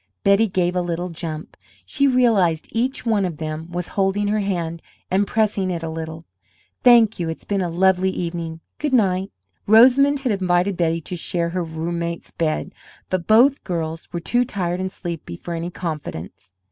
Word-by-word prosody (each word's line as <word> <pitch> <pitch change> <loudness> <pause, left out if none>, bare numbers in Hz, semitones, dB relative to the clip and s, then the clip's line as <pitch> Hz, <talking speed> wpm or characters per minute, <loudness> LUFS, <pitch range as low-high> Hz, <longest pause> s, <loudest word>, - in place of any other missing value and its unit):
Betty 200 +3 +4
gave 180 -2 0
a 180 - +2
little 175 +1 -3
jump; 160 -2 -6 0.3
she 280 - +1
realized 220 - +3
each 250 +4 -1
one 220 -4 +2
of 175 -5 -3
them 155 +2 -5
was 175 0 -4
holding 200 +1 0
her 215 +1 +1
hand 170 -5 -2 0.3
and 195 +2 +2
pressing 210 -3 +1
it 170 -2 -3
a 160 - -3
little. 160 0 -6 0.6
"Thank 235 -4 +6
you, 170 -2 -1
it's 160 - -6
been 200 -1 0
a 175 - -1
lovely 190 +2 +3
evening. 170 -3 -4 0.2
Goodnight." 200 -10 +1 0.4
Rosamond 260 +6 +6
had 255 -3 0
invited 185 -1 +1
Betty 165 -1 0
to 180 - -6
share 170 0 -2
her 180 +1 -2
roommate's 170 +1 -4
bed, 155 -2 -2 0.4
but 185 -3 -1
both 255 +6 +5
girls 165 -2 -4
were 175 - -3
too 240 +8 +1
tired 180 -7 -2
and 190 0 -2
sleepy 170 - -6
for 175 - -6
any 170 +1 -3
confidence. 150 - -6
180 Hz, 170 wpm, -22 LUFS, 165-205 Hz, 0.6 s, Thank